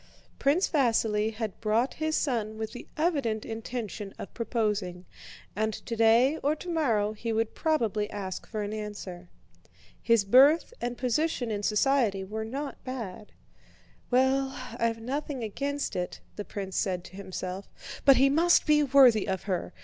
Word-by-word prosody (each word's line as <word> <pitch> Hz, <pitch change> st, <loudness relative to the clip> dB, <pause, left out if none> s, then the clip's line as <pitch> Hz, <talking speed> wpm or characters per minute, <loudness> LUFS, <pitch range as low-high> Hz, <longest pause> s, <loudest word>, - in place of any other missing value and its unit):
Prince 300 Hz, +7 st, +3 dB
Vasíli 225 Hz, -6 st, +2 dB
had 220 Hz, -3 st, -5 dB
brought 230 Hz, +4 st, +1 dB
his 315 Hz, 0 st, +1 dB
son 220 Hz, -6 st, -1 dB
with 220 Hz, 0 st, -4 dB
the 245 Hz, -, -9 dB
evident 280 Hz, -10 st, 0 dB
intention 225 Hz, -3 st, -5 dB
of -, -, -8 dB
proposing, 210 Hz, -6 st, -2 dB, 0.5 s
and 215 Hz, +1 st, 0 dB
today 230 Hz, +5 st, +3 dB
or 290 Hz, +2 st, +1 dB
tomorrow 275 Hz, -, 0 dB
he 230 Hz, +2 st, -4 dB
would 225 Hz, 0 st, 0 dB
probably 225 Hz, -10 st, 0 dB
ask 195 Hz, -3 st, -5 dB
for 215 Hz, -2 st, -3 dB
an 205 Hz, +1 st, -4 dB
answer. 200 Hz, -4 st, -7 dB, 0.7 s
His 230 Hz, -3 st, +3 dB
birth 275 Hz, -, +5 dB
and 240 Hz, 0 st, -3 dB
position 250 Hz, -1 st, 0 dB
in 205 Hz, -1 st, -2 dB
society 215 Hz, -2 st, +2 dB
were 215 Hz, +3 st, -4 dB
not 275 Hz, +5 st, -5 dB
bad. 225 Hz, -6 st, -6 dB, 0.8 s
"Well, 265 Hz, +1 st, +2 dB, 0.2 s
I've 230 Hz, -1 st, 0 dB
nothing 270 Hz, +2 st, -4 dB
against 280 Hz, +6 st, -3 dB
it," 180 Hz, 0 st, -3 dB, 0.2 s
the 205 Hz, -, -5 dB
prince 195 Hz, -2 st, -5 dB
said 185 Hz, -4 st, 0 dB
to 185 Hz, -, -13 dB
himself, 190 Hz, 0 st, -6 dB, 0.3 s
"but 275 Hz, -1 st, +7 dB
he 270 Hz, -, +6 dB
must 330 Hz, +5 st, +4 dB
be 300 Hz, -1 st, +4 dB
worthy 260 Hz, -7 st, +5 dB
of 190 Hz, -2 st, -2 dB
her. 185 Hz, -3 st, -2 dB
225 Hz, 150 wpm, -28 LUFS, 210-270 Hz, 0.8 s, but